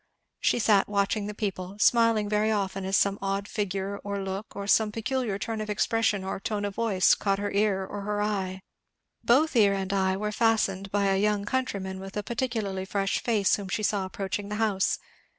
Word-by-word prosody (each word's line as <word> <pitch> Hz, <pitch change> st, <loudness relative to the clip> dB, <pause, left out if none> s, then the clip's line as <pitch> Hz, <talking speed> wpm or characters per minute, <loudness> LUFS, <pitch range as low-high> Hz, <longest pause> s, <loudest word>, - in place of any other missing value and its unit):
She -, -, +2 dB
sat 210 Hz, -4 st, +3 dB
watching 200 Hz, +1 st, 0 dB
the 210 Hz, -, -6 dB
people; 195 Hz, -2 st, -4 dB
smiling 230 Hz, -1 st, +4 dB
very 210 Hz, +1 st, +1 dB
often 195 Hz, -2 st, -1 dB
as 190 Hz, 0 st, +2 dB
some 200 Hz, 0 st, +2 dB
odd 195 Hz, +1 st, -2 dB
figure, 200 Hz, -1 st, -3 dB
or 200 Hz, 0 st, -3 dB
look, 195 Hz, +2 st, -5 dB
or 200 Hz, 0 st, -4 dB
some 210 Hz, +1 st, +3 dB
peculiar 225 Hz, -1 st, -2 dB
turn 220 Hz, +1 st, -3 dB
of 215 Hz, -, -5 dB
expression 210 Hz, -1 st, +1 dB
or 190 Hz, -, -4 dB
tone 205 Hz, 0 st, -2 dB
of 200 Hz, -, -3 dB
voice, 200 Hz, -4 st, +3 dB
caught 195 Hz, -1 st, 0 dB
her 205 Hz, 0 st, -3 dB
ear 200 Hz, -2 st, +1 dB
or 205 Hz, +1 st, -6 dB
her 205 Hz, +1 st, -2 dB
eye. 190 Hz, -3 st, -2 dB, 0.6 s
Both 280 Hz, +5 st, +3 dB
ear 205 Hz, -4 st, +5 dB
and 195 Hz, 0 st, -2 dB
eye 190 Hz, -1 st, +1 dB
were 210 Hz, +1 st, -2 dB
fastened 210 Hz, -4 st, +1 dB
by 205 Hz, 0 st, +1 dB
a 195 Hz, 0 st, +2 dB
young 210 Hz, -1 st, +1 dB
countryman 200 Hz, -6 st, -2 dB
with 195 Hz, +1 st, -8 dB
a 210 Hz, -, -2 dB
particularly 225 Hz, -5 st, -2 dB
fresh 195 Hz, 0 st, -1 dB
face 215 Hz, -5 st, +2 dB
whom 200 Hz, -2 st, -7 dB
she 215 Hz, +4 st, -2 dB
saw 200 Hz, -2 st, +1 dB
approaching 195 Hz, +2 st, -4 dB
the 210 Hz, -, -3 dB
house. 210 Hz, -3 st, +1 dB
200 Hz, 200 wpm, -27 LUFS, 195-215 Hz, 0.6 s, ear